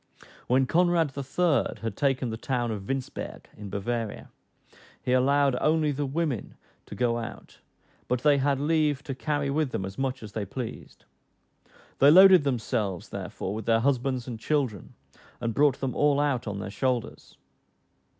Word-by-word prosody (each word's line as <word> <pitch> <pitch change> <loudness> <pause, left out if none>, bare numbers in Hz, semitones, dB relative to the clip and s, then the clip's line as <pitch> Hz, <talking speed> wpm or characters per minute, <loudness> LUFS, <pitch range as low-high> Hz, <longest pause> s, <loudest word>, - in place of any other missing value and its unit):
When 130 +2 +3
Conrad 170 -2 +2
III. 140 +1 0
had 115 - -3
taken 135 -4 0
the - - -3
town 120 0 -2
of 100 -2 -6
Winsberg 135 -1 -5
in 105 -1 -8
Bavaria, 110 +2 -4 0.7
he 125 - -3
allowed 135 +1 +3
only 155 -1 +2
the 145 0 -2
women 145 -5 -2 0.3
to - - -8
go 120 -1 +1
out; 115 - -9 0.5
but 125 -1 0
they 145 -2 +5
had 140 0 +1
leave 150 -2 +1
to 135 - -4
carry 145 +1 -2
with 150 0 0
them 95 - -3
as 95 +4 -8
much 130 -2 -2
as 105 - -8
they 110 - -3
pleased. 115 +4 -7 0.9
They 140 - +7
loaded 185 +1 +8
themselves, 115 -8 -2
therefore, 95 - -5
with 110 0 -6
their 115 -1 +3
husbands 130 -1 0
and 115 -3 -6
children, 130 - -2 0.4
and 115 -1 -2
brought 140 0 +3
them 135 -2 -1
all 145 -1 +3
out 140 -5 0
on 100 -1 -3
their 100 0 -5
shoulders! 125 +1 -3
130 Hz, 160 wpm, -27 LUFS, 115-145 Hz, 0.9 s, loaded